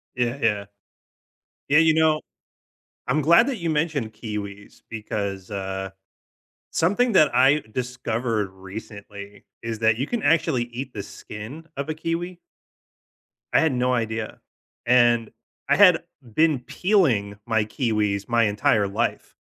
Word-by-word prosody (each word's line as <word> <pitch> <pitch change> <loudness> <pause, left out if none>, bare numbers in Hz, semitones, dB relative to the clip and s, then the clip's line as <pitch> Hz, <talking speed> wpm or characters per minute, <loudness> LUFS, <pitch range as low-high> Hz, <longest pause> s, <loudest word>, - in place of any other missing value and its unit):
Yeah, 120 +1 -1
yeah. 105 -3 +1 1.1
Yeah, 145 - +5
you 160 -1 +5
know, 160 -1 +3 0.9
I'm 155 - +1
glad 170 - +5
that 270 -4 -2
you 170 -4 -3
mentioned 150 -7 -1
kiwis, 105 -2 -7
because, 100 -3 -4
uh, 95 -1 -4 0.8
something 205 +9 +2
that 155 -6 +5
I 135 +3 +5
discovered 115 -3 -2
recently 100 +1 -10 0.2
is 115 -1 -4
that 110 -1 +3
you 130 - -1
can 240 +3 -2
actually 160 -6 +2
eat 125 +2 -7
the 100 - -5
skin 125 +10 -9
of 140 +2 -4
a - - 0
kiwi. 165 +3 -4 1.1
I - - +5
had 160 -2 +2
no 125 0 +1
idea. 115 -2 -3 0.5
And 120 -2 +4 0.4
I - - +4
had 185 -4 +6 0.3
been 155 -2 +3
peeling 125 - +1
my 110 -2 +1
kiwis 105 -4 -1
my 120 -1 +3
entire 105 0 +2
life 110 +4 -2
120 Hz, 135 wpm, -24 LUFS, 105-155 Hz, 1.1 s, had